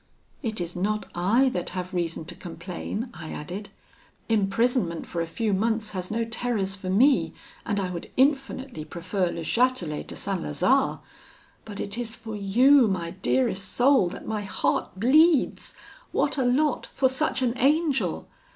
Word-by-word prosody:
'It 220 -5 -3
is 175 0 -4
not 210 +4 -1
I 220 +10 +3
that 180 -8 -3
have 180 0 -4
reason 165 -2 -2
to 175 - -5
complain,' 180 +7 -6
I 160 -2 -8
added; 185 +7 -6 0.6
'imprisonment 215 -3 +1
for 170 - -3
a 165 - -2
few 215 +5 -1
months 220 +2 0
has 185 -2 -4
no 230 +2 0
terrors 225 -4 -1
for 190 -2 -6
me, 255 +9 +3 0.3
and 205 -2 0
I 185 -2 -2
would 170 -2 -6
infinitely 270 - +1
prefer 180 +4 -2
Le 170 - -5
Chatelet 230 -7 0
to - - -8
St. 195 -3 -3
Lazare; 255 - +1 0.6
but 205 -2 -8
it 200 +4 -3
is 235 -1 -4
for 220 -1 -7
you, 240 +6 +5
my 175 -4 -2
dearest 130 +11 0
soul, 255 -7 +4
that - - -8
my 215 -1 -2
heart 200 -1 -1
bleeds. 300 - +3 0.4
What - - +1
a 260 - +2
lot 285 +5 +1
for 265 - +2
such 260 0 0
an 240 -1 +1
angel! 290 +1 +1
210 Hz, 160 wpm, -26 LUFS, 180-250 Hz, 0.6 s, you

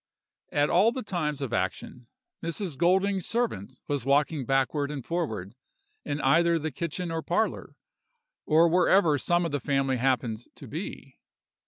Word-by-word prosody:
"At 145 0 +2
all 200 +6 +5
the 255 +1 -5
times 150 -8 -2
of 120 -4 -4
action, 115 +4 -3 0.3
Mrs. 170 -1 -4
Golding's 190 +4 +2
servant 130 - -2
was 145 -4 -1
walking 140 0 +1
backward 135 +2 +1
and 140 -4 -6
forward, 110 - -3 0.5
in 145 - -3
either 170 +5 +4
the 155 0 -3
kitchen 170 +4 -4
or 165 0 -2
parlor, - - -1 0.7
or 160 +2 +5
wherever 170 -3 +4
some 175 +3 +1
of 165 - -2
the 145 - -1
family 135 0 0
happened 125 -3 0 0.2
to - - -11
be. - - -7
150 Hz, 150 wpm, -27 LUFS, 135-170 Hz, 0.7 s, all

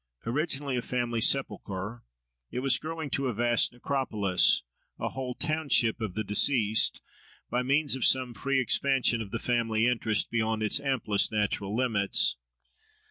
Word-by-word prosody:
Originally 140 +2 -2
a 125 - -1
family 120 -2 -2
sepulchre, 110 -4 -1 0.5
it 125 - -4
was 135 0 +3
growing 160 -2 -6
to 135 +1 -1
a 120 - -3
vast 120 +1 +2
necropolis, 110 -8 +1 0.3
a - - -3
whole 130 -2 -5
township 140 -7 +1
of 105 -5 -4
the 110 - -2
deceased, 110 +1 +2 0.5
by 125 - +1
means 140 +2 +1
of 130 - -4
some 130 -2 +2
free 135 +5 -1
expansion 130 -1 +2
of 105 - -7
the 115 - -3
family 115 -2 0
interest 115 -3 +1
beyond 110 -1 -1
its 105 +6 +2
amplest 130 -8 0
natural 105 -1 -1
limits. 110 -6 +2
120 Hz, 145 wpm, -28 LUFS, 110-135 Hz, 0.5 s, was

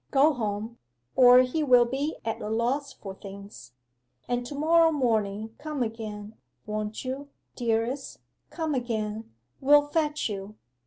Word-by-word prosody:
Go 290 +3 +4
home, 220 -1 -4 0.4
or 250 0 +8
he 255 +5 -1
will 250 -4 +6
be 275 +5 -2
at 225 - -3
a 210 - -4
loss 250 +6 0
for 195 -2 -9
things. 195 - -11 0.5
And 245 0 -1
to 285 - -7
morrow 325 +2 +4
morning 220 -6 0
come 300 -4 -2
again, 215 -2 -6 0.3
won't 215 +2 -4
you, 275 +2 -5 0.3
dearest, 235 +3 -1 0.3
come 320 -3 -2
again 220 -3 -3 0.3
we'll 290 +2 +6
fetch 300 -1 0
you. 200 0 -6
240 Hz, 140 wpm, -27 LUFS, 215-285 Hz, 0.5 s, or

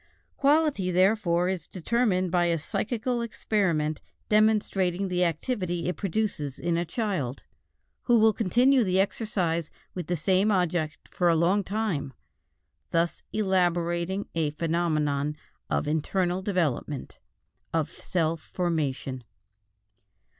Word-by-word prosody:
Quality, 290 -9 +2
therefore, 180 -1 +3
is 185 -4 -3
determined 185 -1 0
by 175 -1 +3
a 170 -1 +2
psychical 235 - -2
experiment 175 -9 0 0.3
demonstrating 200 -3 +2
the 180 0 +1
activity 175 +1 -1
it 180 - -1
produces 190 -8 -2
in 170 -1 -1
a 170 +1 0
child, 170 - -2 0.6
who 240 -1 +5
will 220 0 +5
continue 245 +6 +3
the 185 -2 +1
exercise 180 -6 0 0.2
with 180 - -5
the 175 - 0
same 190 +6 +2
object 175 -5 -1
for 175 -1 +2
a 165 - +4
long 180 +5 +3
time, 190 -10 -2 0.8
thus 165 0 0
elaborating 180 -1 0
a 160 -2 +1
phenomenon 150 -2 0 0.3
of 70 - 0
internal 175 +4 0
development, 160 - -2 0.5
of 160 -2 0
self 165 -2 -1
formation. 145 -8 -2
180 Hz, 115 wpm, -27 LUFS, 165-205 Hz, 0.8 s, who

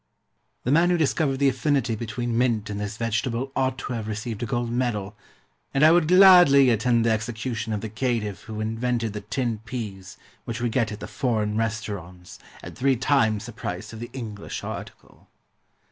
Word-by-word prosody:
The 125 - 0
man 165 +4 +4
who 180 - +3
discovered 150 -3 +1
the 140 +1 +3
affinity 130 -2 0
between 115 +2 -3
mint 115 -4 +1
and 100 - -4
this 105 +1 -4
vegetable 115 +3 -2
ought 130 -1 0
to 125 - -5
have 110 -3 -4
received 110 0 -4
a 120 - -2
gold 120 0 -2
medal, 115 -5 -2 0.6
and 135 - +3
I 160 - +8
would 170 -2 +4
gladly 175 -8 +7
attend 115 +1 +2
the 115 - +3
execution 110 +1 -3
of 105 -2 -2
the 110 - -4
caitiff 110 -3 -2
who 110 -1 -5
invented 115 0 -1
the 105 - -5
tinned 115 0 -3
peas 100 -7 -6 0.3
which 115 +1 -5
we 120 -1 0
get 115 -2 0
at 105 - -7
the - - -5
foreign 110 -5 -1
restaurants, 105 -6 -4 0.2
at - - -9
three 135 +1 +2
times 110 -5 +1
the 120 - -7
price 105 -3 -6
of 110 - -8
the 120 - -6
English 110 -6 -6
article. - - -9
115 Hz, 185 wpm, -25 LUFS, 110-130 Hz, 0.6 s, I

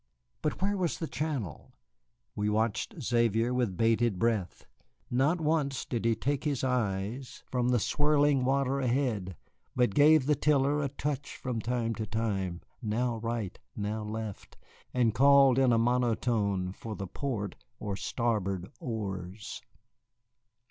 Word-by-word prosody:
But - - -2
where 205 +1 +2
was 180 -4 -1
the 165 - -3
channel? 145 - -4 0.6
We 105 0 0
watched 110 +1 0
Xavier 115 0 +2
with 120 -8 0
bated 115 -1 +2
breath. 110 -3 -1 0.5
Not 140 +8 +2
once 150 -4 0
did 115 -2 -3
he 115 -1 +3
take 135 +5 -1
his 145 -5 -1
eyes 120 0 -2
from 125 -1 +1
the 125 - +4
swirling 145 +1 +3
water 135 +1 +1
ahead, 120 -8 0 0.4
but 125 -5 +2
gave 150 +2 +6
the 150 - +3
tiller 145 0 +2
a 140 - -1
touch 145 0 -4
from 125 -3 -3
time 115 0 -1
to 110 -1 -4
time, 100 -6 -2 0.2
now 115 +1 0
right, 115 -4 -3 0.2
now 105 +1 -2
left, 105 -1 -6 0.3
and 120 -3 +2
called 135 +1 +6
in 130 -2 +4
a 115 - +4
monotone 115 -5 +1
for 110 +1 -7
the 100 - -5
port 105 -1 -3 0.2
or 100 -2 -3
starboard 100 -5 -1
oars. 100 -3 -5
120 Hz, 140 wpm, -30 LUFS, 105-135 Hz, 0.6 s, gave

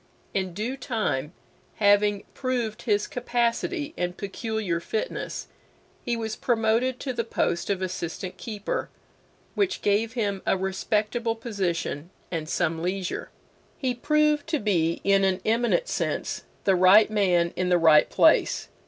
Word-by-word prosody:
In 185 -3 -2
due 235 +7 -3
time, 215 - -2 0.4
having 205 -1 +3
proved 245 -5 -2
his 210 -3 +1
capacity 245 +6 -1
and 180 0 -3
peculiar 205 -3 -2
fitness, 215 +5 -4 0.6
he 235 -1 -1
was 220 -1 -3
promoted 235 +2 +1
to 260 - -3
the 230 - -1
post 190 -6 -1
of 190 -2 0
Assistant 180 0 -4
Keeper, 210 -3 -4 0.6
which 395 -2 0
gave 215 +3 +1
him 205 -5 -1
a - - +3
respectable 210 +4 -1
position 185 - -3 0.2
and 160 -3 -3
some 165 -2 0
leisure. 185 +1 -3 0.5
He 260 -3 -1
proved 300 +3 +2
to 325 -1 +1
be 170 - 0
in 195 0 +4
an 190 -1 +2
eminent 240 - +2
sense - - -2 0.2
the 195 - +4
right 190 +4 +6
man 180 -5 +2
in 180 +1 0
the 180 - +5
right 160 -3 +6
place. - - +3
210 Hz, 135 wpm, -26 LUFS, 185-235 Hz, 0.6 s, right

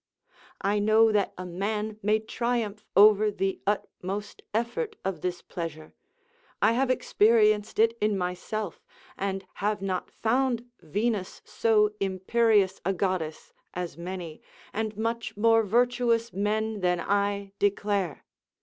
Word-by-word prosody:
I 205 +1 +1
know 220 +2 +5
that 205 -2 +1
a 185 - -5
man 210 +4 -3
may 210 +2 +3
triumph 220 -1 -2
over 210 +1 +7
the 195 -1 -2
utmost 205 0 -3
effort 240 - -2
of 190 -5 -2
this 180 -1 -3
pleasure: 160 -2 -6 0.7
I 220 - +4
have 255 +3 +1
experienced 215 -3 +3
it 230 +1 +4
in 210 -1 +2
myself, 180 +2 -4 0.3
and 195 -1 -3 0.2
have 210 +1 +1
not 190 -1 -3
found 245 +1 0 0.2
Venus 200 +4 -2
so 210 -2 +2
imperious 195 +1 +2
a 195 - +1
goddess, 180 -4 -2 0.2
as 180 -4 -4
many, 170 -1 -6 0.3
and 215 -1 -3
much 230 -1 -3
more 225 +1 +5
virtuous 235 +1 +1
men 215 +2 -1
than 180 -2 +1
I, 200 +1 0
declare. 200 -4 0
210 Hz, 125 wpm, -27 LUFS, 190-220 Hz, 0.7 s, over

